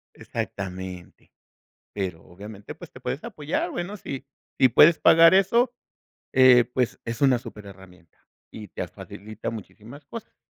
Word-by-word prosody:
Exactamente. 95 -2 -7 0.6
Pero 90 -5 -4
obviamente 100 +2 -11
pues, - - -12
te - - -13
puedes 140 - -4
apoyar 175 -5 -3
bueno 175 +4 -5
si, 135 -5 -7 0.3
si 130 - +6
puedes 155 +7 +6
pagar 165 +1 +7
eso, 235 +6 +3 0.6
eh, 130 -2 +6
pues, 125 -2 -1
es 115 0 -5
una 130 -3 +4
súper 105 -3 -11
herramienta 95 -3 -16 0.3
y 105 -1 -9
te - - -5
facilita 110 +3 -8
muchísimas 115 +5 -11
cosas. 230 +8 -10
115 Hz, 135 wpm, -24 LUFS, 100-150 Hz, 0.6 s, pagar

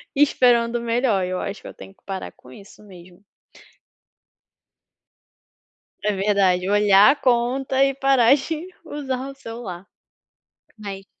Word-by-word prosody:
e 285 - +1
esperando 240 -4 +2
o 235 - -5
melhor. 230 -5 0
Eu 185 0 -3
acho 200 +1 -6
que - - -11
eu - - -10
tenho 195 - -13
que - - -37
parar 195 -1 -6
com 125 - -19
isso 200 +9 -15
mesmo. 180 -1 -16 2.8
É 210 - +1
verdade, 190 -2 +1
olhar 205 +2 +5
a 290 - 0
conta 260 +1 +1
e 275 - 0
parar 270 -2 +4
de 315 +4 -5 0.2
usar 270 -2 -5
o 275 - -10
celular. 225 -8 -9 0.9
Mas 195 -2 -8
230 Hz, 140 wpm, -22 LUFS, 195-265 Hz, 2.8 s, olhar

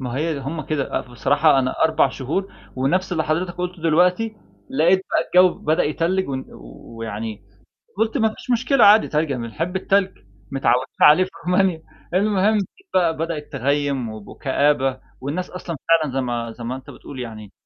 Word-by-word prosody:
ما 125 -1 -4
هي 160 +3 0
ده 140 - -5
هُم 155 +4 -4
كده، 150 -3 -1
آآ، - - -3
بصراحة 135 +5 +2
أنا 130 -1 0
4 155 -3 +3
شهور 150 +10 -3 0.2
ونَفْس 180 +9 0
اللي 160 -2 0
حضرتك 175 +3 -1
قُلته 180 -1 -5
دلوقتي، 180 +7 +2 0.3
لقيت 170 +7 +3
بقى 180 - +4
الجو 185 - +3
بدأ 155 +3 +1
يتلّج 170 +4 0
و 135 - -2 0.6
ويعني 110 -1 -5 0.5
قُلت 225 +4 0
ما 220 -2 +3
فيش - - -10
مشكلة 250 +2 +3
عادي، 210 +2 +7
تلج 155 -1 0
بنحب 135 - -3
التلج، 190 - +1 0.3
متعودين 130 -1 +1
عليه 155 +5 +7
في 185 - -10 0.2
رومانيا. 180 -2 +2 0.3
المهم 205 +2 +2 0.4
بقى 170 -3 +3
بدأت 160 -2 -4
تغيم 140 -2 0
وكآبة 130 +5 0 0.2
والناس 150 +8 -4
أصلًا 180 -2 -6
فعلًا 160 -4 +3
زي 135 - +1
ما 120 -2 -3
زي 115 +1 -10
ما 125 +2 -3
أنت 130 - -11
بتقول 135 -2 -10
يعني 110 -4 -8
155 Hz, 165 wpm, -21 LUFS, 130-180 Hz, 0.6 s, عادي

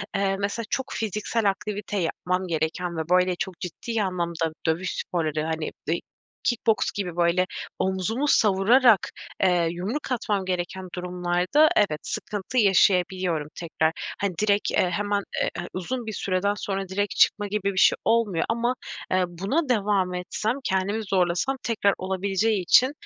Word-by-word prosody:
eee, 195 -1 +1
mesela 205 +3 -2
çok 265 - -1
fiziksel 215 0 0
aktivite 210 0 -4
yapmam 180 +1 -1
gereken 165 +2 -2
ve, - - 0
böyle, 180 0 +3
çok 180 -1 -5
ciddi 180 +6 -6
anlamda 170 -4 -1
dövüş 170 +3 0
sporları, 155 -3 -1
hani, 160 -1 -2 0.2
dey 165 +2 0 0.4
kick 240 -1 -1
boks 220 - +3
gibi 180 -4 -4
böyle 175 +1 +3 0.3
omuzumu 190 +9 0
savurarak, 220 +1 +5 0.3
eee, 180 -3 +3
yumruk 215 - -4
atmam 205 -5 -1
gereken 185 +1 -3
durumlarda 180 - +2
evet, 155 - +2
sıkıntı 205 +5 -4
yaşayabiliyorum 185 -5 +3
tekrar. 160 -1 0 0.3
Hani, 200 -3 0
direkt, 205 -1 +2
eee, 180 - +2
hemen, 205 +2 -1 0.2
eee, - - +1
a 175 - -4
uzun 235 +7 -3
bir 220 - -4
süreden 195 +1 0
sonra 195 -1 -3
direkt 205 +2 -1
çıkma 205 -1 +3
gibi 200 -1 -1
bir - - -9
şey - - +6
olmuyor 220 -7 +2
ama, 235 +2 +1 0.4
eee, 185 0 +3
buna 200 - -1
devam 200 -5 +1
etsem, 185 +5 -2
kendimi 195 +3 0
zorlasam 190 +7 +1
tekrar 205 -3 +2
olabileceği 190 +2 0
için, 255 +9 +5
190 Hz, 150 wpm, -25 LUFS, 180-210 Hz, 0.4 s, şey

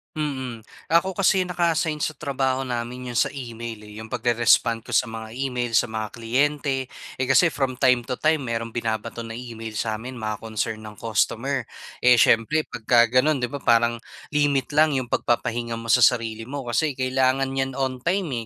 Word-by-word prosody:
Mm. 130 -6 -3 0.3
Ako 185 +3 +3
kasi 190 -1 +4
naka-assign 170 -3 0
sa 155 +1 -2
trabaho 135 -2 -1
namin 125 0 -4
'yong 120 - -3
sa - - +2
email, 115 -4 -7
eh. 105 0 -12
'Yong 110 +1 -8
pagre-respond 120 -1 +2
ko - - -7
sa 120 - +3
mga 110 0 -7
email, 125 -2 -2
sa 110 - +3
mga 110 -1 -4
kliyente. 135 +3 0 0.3
Eh, 130 - 0
kasi 165 +6 +5
from 135 -3 -1
time 125 -3 +4
to 125 - -3
time 155 -3 +2
merong 115 0 -3
binabato 115 0 -3
na 115 - -7
email 115 -2 -7
sa 110 +1 -2
amin, 125 +3 -8
mga 110 -3 -4
concern 110 0 -4
ng 105 -1 -9
customer. 115 +5 0 0.3
Eh, 125 0 +5
siyempre 115 +8 +4
pagka 115 0 +3
gano'n 130 +2 +3
'di 120 - -1
ba, 140 - -4
parang 115 -2 +3 0.3
limit 145 -2 +1
lang 150 0 +3
'yong 130 -3 -2
pagpapahinga 120 0 -1
mo 115 - -8
sa 120 0 +7
sarili 115 -2 0
mo 140 +2 -5
kasi 130 +5 0
kailangan 130 +1 +1
niyan 135 0 -2
on 130 -1 -2
time, 155 - -1
125 Hz, 180 wpm, -24 LUFS, 115-135 Hz, 0.3 s, sa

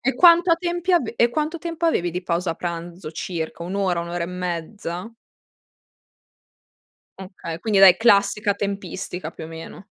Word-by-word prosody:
E 270 +2 0
quanto 345 0 +6
a 330 - +5
tempi 350 +1 -1
avev 315 -10 +2
e 235 - +4
quanto 310 +5 -2
tempo 335 0 -2
avevi 175 - +1
di 180 +2 -4
pausa 170 -1 -1
pranzo 170 -1 -6
circa? 165 0 -5
1 180 +3 -5
ora, 185 -4 0
1 170 - -6
ora 170 0 -2
e - - -5
mezza? 180 +3 -5 2.0
Okay. 185 -4 -7
Quindi 210 -1 +1
dai, 190 -2 +9
classica 205 -2 +3
tempistica, 195 -4 -4
più - - -9
o - - -7
meno. 165 +4 -10
190 Hz, 160 wpm, -23 LUFS, 170-235 Hz, 2.0 s, dai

